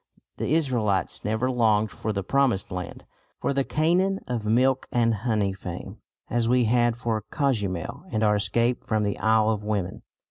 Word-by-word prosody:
The 155 - 0
Israelites 120 - 0
never 110 +5 0
longed 110 -4 +2
for 110 - -3
the 100 -2 -2
Promised 130 -3 +1
Land, 90 -1 -6 0.3
for - - 0
the 135 0 +1
Canaan 180 +7 +1
of 115 -4 -3
milk 130 +4 +2
and 115 -1 +2
honey 105 -3 0
fame, 90 -2 -7 0.3
as 115 0 0
we 125 0 +4
had 120 0 +2
for 115 -3 -2
Cozumel 105 - -2
and 110 -2 0
our 105 -1 +4
escape 120 +4 0
from 110 -1 0
the 100 -1 -2
Isle 110 0 +3
of 105 -1 -3
Women. 100 -4 -2
110 Hz, 170 wpm, -25 LUFS, 105-125 Hz, 0.3 s, we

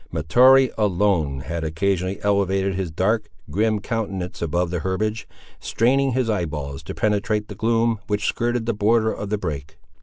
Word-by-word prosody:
Mahtoree, 125 - +5
alone, 90 -9 +1
had 85 +3 -4
occasionally 95 +3 -1
elevated 100 -1 +1
his 95 -2 -3
dark, 105 +6 0 0.2
grim 110 +5 +1
countenance 100 -4 -4
above 85 +1 0
the 90 - -1
herbage, 105 +5 -2 0.3
straining 135 +3 +1
his 130 -1 0
eye 105 -6 0
balls 70 -3 -5
to - - -8
penetrate 105 0 0
the - - -6
gloom 115 +1 +1
which 105 0 -1
skirted 120 0 0
the 115 - 0
border 110 +2 +2
of 105 - -6
the 105 - 0
brake. 75 -4 -5
100 Hz, 160 wpm, -22 LUFS, 85-110 Hz, 0.3 s, Mahtoree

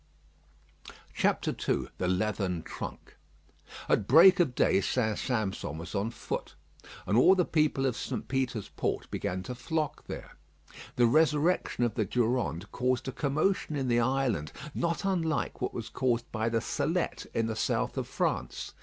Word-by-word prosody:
II - - +2 0.5
THE 90 - 0
LEATHERN 95 -2 0
TRUNK - - -8 0.7
At 100 - +2
break 175 +8 +8
of 145 -8 +2
day 95 - +3
St. 110 0 0
Sampson 105 - -2
was 85 +2 -7
on 100 +2 0
foot, - - -5 0.5
and 105 - +1
all 155 +11 +7
the 180 -2 +2
people 150 -4 +1
of 130 -3 +1
St. - - -4
Peter's 130 -6 -1
Port - - -3
began 95 +1 -2
to 125 - -5
flock 150 +4 -3
there. - - -7 0.6
The 120 - +4
resurrection 150 +1 +2
of 120 -3 +1
the 110 - 0
Durande 115 -5 0
caused 125 0 0
a - - -3
commotion 150 +5 0
in 135 -3 -1
the 120 0 +3
island 120 - 0 0.2
not 170 +4 -1
unlike 165 -8 -1
what 125 - -1
was 115 -2 -5
caused 120 -3 -1
by 110 0 0
the 115 0 0
Salette - - -1
in 115 - +2
the 110 -1 -2
south - - 0
of - - -3
France. - - -2
125 Hz, 155 wpm, -29 LUFS, 110-150 Hz, 0.7 s, break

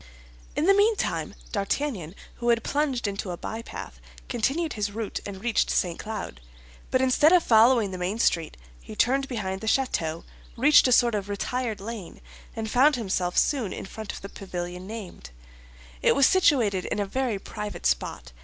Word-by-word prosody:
In 310 - +1
the 395 - +6
meantime 415 +2 +1 0.2
D'Artagnan, 200 - -2 0.2
who 240 0 -1
had 230 -1 +3
plunged 280 -6 0
into 200 -1 -4
a 175 - -4
bypath, 225 +5 -7 0.3
continued 275 +7 0
his 210 -2 -2
route 220 0 -4
and 195 0 -8
reached 240 -3 +1
St. 175 -2 0
Cloud; 215 - -6 0.5
but 255 0 +2
instead 260 +4 +5
of 360 -2 +5
following 225 -2 +5
the 185 - -6
main 185 +4 -2
street 165 - +1 0.2
he - - -10
turned 270 - +2
behind 195 -7 -3
the 220 - -5
château, 170 -10 0 0.3
reached 280 +3 +6
a - - +1
sort 240 -1 +5
of 205 -1 -2
retired 225 +2 -2
lane, 210 -3 -7 0.4
and 220 -1 -3
found 265 +6 +4
himself 185 -6 -1
soon 250 -10 +2
in - - -6
front 215 +2 -7
of - - -9
the 195 - -8
pavilion 180 -1 -6
named. 200 - -8 0.7
It - - +4
was 275 - +5
situated 245 - +3
in - - -2
a 205 - 0
very 245 +1 -1
private 210 - -7
spot. - - -1
220 Hz, 175 wpm, -26 LUFS, 195-255 Hz, 0.7 s, the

